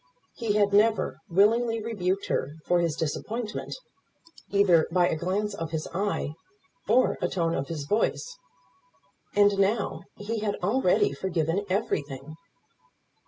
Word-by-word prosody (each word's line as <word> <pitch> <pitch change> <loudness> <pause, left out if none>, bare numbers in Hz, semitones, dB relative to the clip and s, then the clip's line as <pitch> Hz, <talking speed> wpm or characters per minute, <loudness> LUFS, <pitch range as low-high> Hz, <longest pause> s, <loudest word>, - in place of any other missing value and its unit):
He 225 -4 -1
had 205 -1 +2
never 220 +2 +3
willingly 225 +5 +3
rebuked 200 -4 -2
her 145 +3 -2
for 175 - +3
his 165 -3 0
disappointment, 210 +8 -3 0.7
either 190 -5 +4
by 175 0 +4
a - - 0
glance 195 +6 -1
of 165 -5 -4
his 160 -1 -3
eye, 195 -5 -1 0.6
or 250 +4 +3
a - - +2
tone 170 -2 0
of 135 -2 -2
his 155 -4 -4
voice; 145 - 0 1.0
and 205 -1 +4
now 200 +2 +1 0.2
he 220 +2 -3
had 210 -1 -1
already 185 - +2
forgiven 170 +3 -1
everything. 155 - -2
195 Hz, 130 wpm, -27 LUFS, 165-210 Hz, 1.0 s, either